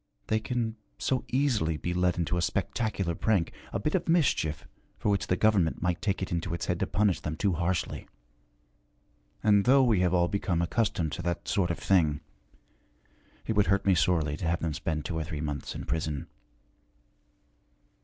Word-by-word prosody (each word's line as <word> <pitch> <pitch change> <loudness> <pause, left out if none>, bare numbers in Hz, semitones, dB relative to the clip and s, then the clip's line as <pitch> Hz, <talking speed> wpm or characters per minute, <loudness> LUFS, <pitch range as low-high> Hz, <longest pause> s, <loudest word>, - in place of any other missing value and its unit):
They 110 - +2
can 115 -1 -2 0.2
so 130 -2 0
easily 120 - +1
be 85 +3 -3
led 90 0 +1
into 85 0 0
a 90 - 0
spectacular 95 -1 -1
prank, 95 0 +1 0.2
a - - -2
bit 150 +9 -1
of 185 - 0
mischief 105 - +1 0.3
for - - -1
which 100 -1 +1
the 90 - +2
government 95 -7 +2
might 90 -1 0
take 100 -1 -1
it - - -5
into 85 0 -2
its - - -4
head 90 -1 -1
to - - 0
punish 100 0 +2
them 75 - -4
too 100 -3 +1
harshly. 85 +1 -2 1.4
And 105 -2 +4
though 135 +2 +6
we 115 -6 +3
have 90 -1 +2
all 85 -1 +3
become 95 -3 -1
accustomed 85 -3 0
to - - -4
that 85 -1 -3
sort 95 -3 +1
of 85 - -1
thing, 80 -6 +2 1.2
it 110 - 0
would 105 -1 +3
hurt 100 0 +2
me 95 - +5
sorely 80 -3 +2
to 85 - -3
have 85 +1 0
them 80 -2 -1
spend 75 +1 -3
two 85 -3 -2
or - - -1
three 80 -1 -5
months 75 -2 -4
in - - -6
prison.' 80 -3 -2
90 Hz, 185 wpm, -28 LUFS, 80-105 Hz, 1.4 s, though